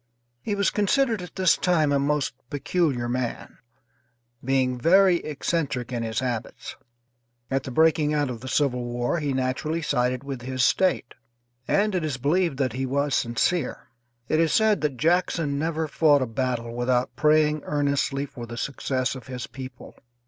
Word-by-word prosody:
He 205 - -2
was 200 -1 +1
considered 225 +1 +1
at 180 -2 -10
this 185 -2 +4
time 160 -5 +2
a 140 - +3
most 145 0 0 0.2
peculiar 145 -4 0
man, 125 -1 -4 0.8
being 130 -1 +1
very 185 +5 +5
eccentric 145 -5 -2
in 120 - -2
his 110 0 -2
habits. 120 -4 -4 0.8
At 135 0 +1
the - - -5
breaking 155 +2 +3
out 145 -1 +1
of 115 -2 -7
the 130 - -8
civil 125 0 +1
war 120 +6 -1
he 145 -2 -1
naturally 135 +5 -1
sided 125 -2 0
with 135 -3 -6
his 130 +1 0
State, 185 +3 +1 0.5
and 210 +1 +2
it 180 -3 0
is 150 -5 -2
believed 155 +3 +1
that 130 -4 0
he 130 +1 -2
was 140 +2 0
sincere. 125 +6 0 0.4
It 155 - +1
is 165 -1 +3
said 220 -2 +3
that 145 -4 -1
Jackson 165 -1 +1
never 160 0 -1
fought 145 -2 +3
a - - -1
battle 120 -1 -3
without 125 +1 0
praying 155 0 +3
earnestly 140 -1 0
for 120 -4 -9
the 120 +1 -8
success 130 -1 -2
of 130 0 -10
his 125 -2 -5
people. 130 -2 -10
140 Hz, 165 wpm, -25 LUFS, 125-160 Hz, 0.8 s, very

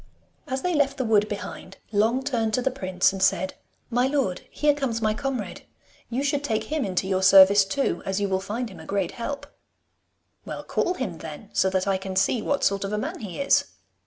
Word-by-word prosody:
As 265 -1 -3
they 360 - +1
left 280 -2 +1
the 260 - -1
wood 210 -2 +3
behind, 200 -2 -7
Long 225 +5 +2
turned 225 -6 0
to 250 - 0
the 265 - +1
prince 185 -7 +1
and 195 - -5
said, 190 0 +2 0.4
'My 245 +2 +2
lord, 265 -10 0
here 295 0 +2
comes 270 -6 -2
my 215 -1 +1
comrade. 245 -6 -4 0.5
You 250 +4 -1
should 285 0 0
take 220 -6 0
him 310 -2 -2
into 185 -2 -1
your 190 -1 0
service 195 +1 +8
too, 270 +8 -1
as 190 +1 -1
you 200 - 0
will 190 -1 0
find 220 +4 -4
him - - -12
a - - -10
great 195 -3 -1
help.' 280 +4 -5 1.0
'Well, - - -6
call 360 - 0
him 185 - -4
then, 160 +7 -9
so 190 - +3
that 185 0 0
I 195 -1 +1
can 190 0 -6
see 195 +5 +2
what 285 +5 -1
sort 200 0 +2
of 195 - -3
a - - 0
man 210 - -4
he 195 -5 -7
is. 280 - +3
215 Hz, 220 wpm, -25 LUFS, 190-265 Hz, 1.0 s, service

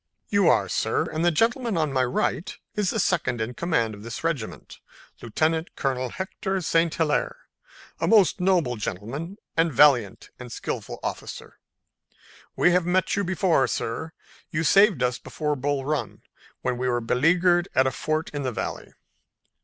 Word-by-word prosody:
"You 200 -3 +3
are, - - +3
sir, - - 0
and 160 +1 -1
the 175 - +5
gentleman 230 - +1
on 155 -4 0
my 130 -1 +2
right 125 +7 -1 0.2
is 210 -3 0
the 225 - -1
second 170 - 0
in 110 +3 -3
command 160 -9 0
of 100 - -11
this 115 +6 -7
regiment, 155 -10 -4 0.4
Lieutenant 160 +8 -1
Colonel 130 -2 -1
Hector 190 +2 -3
St. 165 0 +2
Hilaire, 160 -3 0 0.6
a - - 0
most 205 -4 +4
noble 180 -10 +2
gentleman 130 - -5 0.2
and 165 0 +2
valiant 125 -6 +3
and - - -9
skillful - - -5
officer. - - -6 1.0
We 175 - +4
have 180 0 +3
met 185 +1 +1
you 200 - 0
before, 180 -5 +2
sir. 160 +8 -3 0.4
You 165 -2 -1
saved 195 - +5
us 125 0 0
before 150 -1 -3
Bull 140 0 -2
Run 150 +1 -3 0.4
when 125 -1 -1
we 125 0 0
were 120 -1 +1
beleaguered 175 +9 +2
at 130 - +4
a 130 - +1
fort 155 +3 -2
in 145 - -3
the 130 -2 -2
Valley." - - -5
160 Hz, 160 wpm, -25 LUFS, 125-180 Hz, 1.0 s, the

